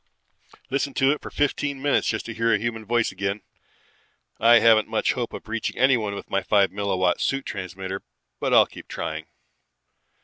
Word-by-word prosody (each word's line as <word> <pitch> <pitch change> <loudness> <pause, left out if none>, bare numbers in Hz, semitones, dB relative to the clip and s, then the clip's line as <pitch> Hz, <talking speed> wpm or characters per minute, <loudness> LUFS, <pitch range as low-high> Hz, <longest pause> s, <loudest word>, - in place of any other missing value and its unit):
Listened 140 +1 -1
to 135 0 +3
it 150 - -2
for - - -8
fifteen 145 -1 -1
minutes 145 +1 +1
just 110 - -1
to 115 - -5
hear 115 +1 +1
a - - +4
human 110 -2 -4
voice 120 -1 +1
again. 95 +2 -3 1.0
I 115 +2 +7
haven't 110 -2 +5
much 110 0 0
hope 120 -3 -3
of - - -9
reaching 115 +1 -3
anyone 120 -6 +2
with - - -8
my 100 - +1
five 100 0 +3
milliwatt 95 -3 0
suit 135 0 -1
transmitter 95 +1 -5 0.4
but - - -1
I'll - - +7
keep - - -13
trying. 80 0 -5
110 Hz, 175 wpm, -24 LUFS, 100-120 Hz, 1.0 s, I